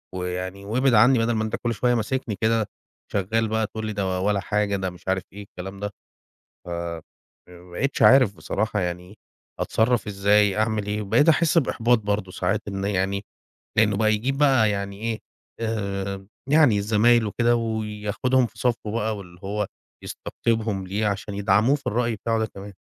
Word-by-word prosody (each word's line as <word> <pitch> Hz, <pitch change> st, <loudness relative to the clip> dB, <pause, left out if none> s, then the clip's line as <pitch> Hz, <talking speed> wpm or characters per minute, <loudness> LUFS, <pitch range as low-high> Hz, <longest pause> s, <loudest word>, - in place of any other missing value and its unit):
ويعني 90 Hz, +2 st, -4 dB
وابعد 125 Hz, +4 st, +2 dB
عني 120 Hz, +3 st, +6 dB
بدل 115 Hz, +1 st, +1 dB
ما 110 Hz, 0 st, 0 dB
أنت 110 Hz, -, -2 dB
كل 120 Hz, -1 st, -2 dB
شوية 120 Hz, +3 st, +1 dB
ماسكني 115 Hz, -1 st, -2 dB
كده، 110 Hz, -1 st, +2 dB, 0.4 s
شغال 110 Hz, +3 st, 0 dB
بقى 110 Hz, 0 st, 0 dB
تقول 110 Hz, 0 st, -6 dB
لي 110 Hz, -, -3 dB
ده 95 Hz, -2 st, -1 dB
ولا 100 Hz, +1 st, +1 dB
حاجة 105 Hz, +1 st, 0 dB
ده 95 Hz, -1 st, -2 dB
مش 90 Hz, +1 st, -15 dB
عارف 95 Hz, 0 st, 0 dB
إيه 100 Hz, +1 st, -8 dB
الكلام 95 Hz, 0 st, -9 dB
ده." 105 Hz, 0 st, -3 dB, 0.7 s
ف -, -, -8 dB, 0.8 s
فما 90 Hz, 0 st, -15 dB
بقيتش 135 Hz, +7 st, -2 dB
عارف 110 Hz, -3 st, +6 dB
بصراحة 105 Hz, +6 st, -2 dB
يعني، 90 Hz, +3 st, -4 dB, 0.4 s
أتصرف 115 Hz, 0 st, +1 dB
إزاي 100 Hz, 0 st, +3 dB
أعمل 110 Hz, -1 st, 0 dB
ايه؟ 105 Hz, +1 st, -2 dB
بقيت 120 Hz, +11 st, +4 dB
أحس 165 Hz, +1 st, +3 dB
بإحباط 120 Hz, -5 st, +3 dB
برضه 100 Hz, -2 st, -2 dB
ساعات -, -, -1 dB
إن 95 Hz, -1 st, -4 dB
يعني 100 Hz, 0 st, -1 dB, 0.5 s
لأنه 105 Hz, -2 st, +4 dB
بقى 110 Hz, 0 st, +3 dB
يجيب 130 Hz, +6 st, -1 dB
بقى 135 Hz, -7 st, +4 dB
يعني 100 Hz, 0 st, -4 dB
إيه 115 Hz, -1 st, -2 dB, 0.4 s
آآ 100 Hz, -3 st, -3 dB, 0.2 s
يعني 145 Hz, -10 st, +5 dB
زمايله 110 Hz, +2 st, +3 dB
وكده 120 Hz, +3 st, +2 dB
وياخدهُم 110 Hz, +3 st, 0 dB
في -, -, -21 dB
صفه 115 Hz, -4 st, -1 dB
بقى 110 Hz, -1 st, -1 dB
واللي 90 Hz, -3 st, -12 dB
هو 105 Hz, +1 st, -2 dB, 0.4 s
يستقطبهم 110 Hz, -5 st, -2 dB
ليه، 105 Hz, +3 st, -1 dB
عشان 100 Hz, 0 st, -3 dB
يدعموه 100 Hz, +6 st, +3 dB
في 140 Hz, -, -8 dB
الرأي 115 Hz, 0 st, 0 dB
بتاعه 115 Hz, +2 st, -1 dB
ده 110 Hz, -, +1 dB
كمان. 100 Hz, -1 st, -10 dB
105 Hz, 170 wpm, -24 LUFS, 100-115 Hz, 0.8 s, عني